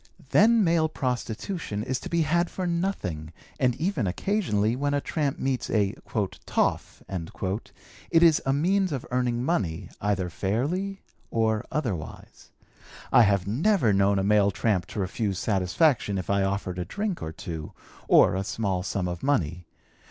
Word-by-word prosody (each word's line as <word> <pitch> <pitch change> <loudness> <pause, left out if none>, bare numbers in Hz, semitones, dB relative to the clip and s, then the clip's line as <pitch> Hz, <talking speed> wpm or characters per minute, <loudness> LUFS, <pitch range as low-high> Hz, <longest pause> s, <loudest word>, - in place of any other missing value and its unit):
Then 225 +5 +5
male 165 -2 +2
prostitution 125 - -3
is 130 +2 -2
to - - -7
be 170 -1 +2
had 170 +3 +1
for 185 - -4
nothing, 170 - -2 0.3
and 125 -2 +2
even 155 - -1
occasionally 110 - 0
when 145 +2 0
a - - +2
tramp 145 -1 -2
meets 130 -1 -2
a 105 -2 +1 0.5
'toff' - - -1 1.1
it 165 0 +5
is 160 -3 +6
a 135 - +1
means 185 +6 +2
of 135 -4 -3
earning 125 -1 0
money, 95 - -1
either 100 -3 0
fairly 150 - -2 0.3
or 110 -1 +1
otherwise. 105 - -5 0.6
I - - +7
have 100 -4 +3
never 125 - +2
known 100 +1 +3
a 95 - +1
male 100 0 +4
tramp 100 -2 0
to - - -6
refuse 100 +1 -1
satisfaction 100 - +1
if 95 - -3
I 100 0 +2
offered 95 -2 -2
a 90 - -2
drink 205 - -3
or 80 - -4
two, 80 -1 -7 0.3
or - - +6
a 95 - -1
small 100 -3 -1
sum 95 0 -2
of 85 -1 -4
money. 90 - 0
115 Hz, 155 wpm, -26 LUFS, 95-160 Hz, 1.1 s, I